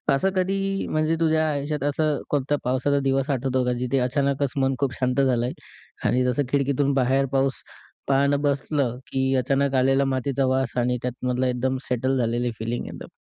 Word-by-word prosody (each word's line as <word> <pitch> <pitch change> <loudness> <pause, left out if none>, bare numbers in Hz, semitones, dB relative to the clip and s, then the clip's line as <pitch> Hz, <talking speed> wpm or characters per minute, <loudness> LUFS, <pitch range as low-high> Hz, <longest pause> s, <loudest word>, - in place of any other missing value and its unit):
असं 190 +8 +1
कधी 195 +1 0
म्हणजे 155 +1 +1
तुझ्या 160 -1 +2
आयुष्यात 145 0 -2
असं 150 0 0
कोणत्या 145 0 0
पावसाचा 130 +3 +1
दिवस 135 +1 +1
आठवतो 130 -1 0
का? 125 - +1
जिथे 125 +2 0
अचानकच 140 +1 0
मन 135 0 +1
खूप 135 -3 0
शांत 130 +1 +1
झालं 125 -3 +2
आहे 125 - -3 0.6
आणि 125 - +2
जसं 125 +3 +1
खिडकीतून 140 0 +1
बाहेर 135 +1 +2
पाऊस 135 -1 0 0.4
पाहणं 140 +1 +2
बसलं, 140 -3 0
की 135 0 0
अचानक 135 +1 +1
आलेला 135 +1 +3
मातीचा 135 0 0
वास 130 -1 0
आणि 125 0 +1
त्यातमधलं 125 +1 -1
एकदम 130 +1 0
सेटल 130 +2 0
झालेली 120 +1 0
फिलिंग 115 +2 -3
एकदम? - - -8
135 Hz, 170 wpm, -24 LUFS, 125-140 Hz, 0.6 s, आलेला